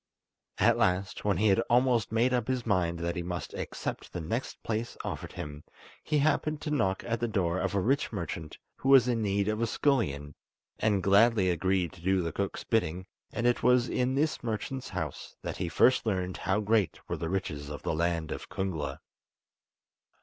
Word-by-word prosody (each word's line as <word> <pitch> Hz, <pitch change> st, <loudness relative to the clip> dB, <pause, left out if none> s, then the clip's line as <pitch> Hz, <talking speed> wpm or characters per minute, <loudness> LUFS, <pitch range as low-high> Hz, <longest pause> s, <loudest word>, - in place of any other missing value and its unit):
At 115 Hz, +4 st, +4 dB
last, 95 Hz, -2 st, +1 dB
when 100 Hz, -4 st, +2 dB
he 105 Hz, +3 st, +3 dB
had 95 Hz, -, +4 dB
almost 120 Hz, -2 st, +3 dB
made 120 Hz, +3 st, +2 dB
up 120 Hz, -3 st, 0 dB
his 130 Hz, -2 st, -1 dB
mind 90 Hz, -5 st, +1 dB
that 85 Hz, 0 st, -1 dB
he 85 Hz, -, -2 dB
must 85 Hz, 0 st, -5 dB
accept -, -, -5 dB
the -, -, -3 dB
next 110 Hz, +11 st, -4 dB
place 115 Hz, +1 st, -3 dB
offered -, -, -5 dB
him, 75 Hz, 0 st, -7 dB, 0.4 s
he 150 Hz, -, +1 dB
happened 155 Hz, +1 st, +1 dB
to 150 Hz, -, -3 dB
knock 95 Hz, -10 st, +1 dB
at 115 Hz, -1 st, -1 dB
the 120 Hz, -, 0 dB
door 95 Hz, -5 st, 0 dB
of 95 Hz, 0 st, -1 dB
a -, -, +3 dB
rich 135 Hz, +9 st, +1 dB
merchant 85 Hz, -6 st, -5 dB, 0.2 s
who 135 Hz, -, -2 dB
was 135 Hz, -3 st, +7 dB
in 120 Hz, -2 st, +1 dB
need 100 Hz, -1 st, +1 dB
of 110 Hz, +1 st, 0 dB
a 115 Hz, -, +2 dB
scullion, 75 Hz, -, 0 dB, 0.5 s
and 105 Hz, -3 st, +2 dB
gladly 100 Hz, -1 st, +5 dB
agreed 90 Hz, 0 st, 0 dB
to -, -, -14 dB
do 95 Hz, +1 st, +2 dB
the 85 Hz, -, -2 dB
cook's 100 Hz, +4 st, -3 dB
bidding, 95 Hz, -5 st, 0 dB, 0.3 s
and 120 Hz, -, -2 dB
it 120 Hz, 0 st, +3 dB
was 125 Hz, 0 st, +4 dB
in 125 Hz, +1 st, 0 dB
this 155 Hz, +3 st, +1 dB
merchant's 120 Hz, +4 st, -3 dB
house -, -, -5 dB
that -, -, -4 dB
he 90 Hz, -2 st, -2 dB
first 130 Hz, +9 st, +4 dB
learned 95 Hz, -4 st, -1 dB
how 95 Hz, +4 st, 0 dB
great 105 Hz, -3 st, +1 dB
were -, -, -2 dB
the 80 Hz, -, -3 dB
riches 80 Hz, -6 st, -3 dB
of 75 Hz, -2 st, -7 dB
the -, -, -1 dB
land 85 Hz, -1 st, 0 dB
of -, -, -6 dB
Kungla. 80 Hz, -8 st, -3 dB
100 Hz, 195 wpm, -29 LUFS, 85-120 Hz, 0.5 s, was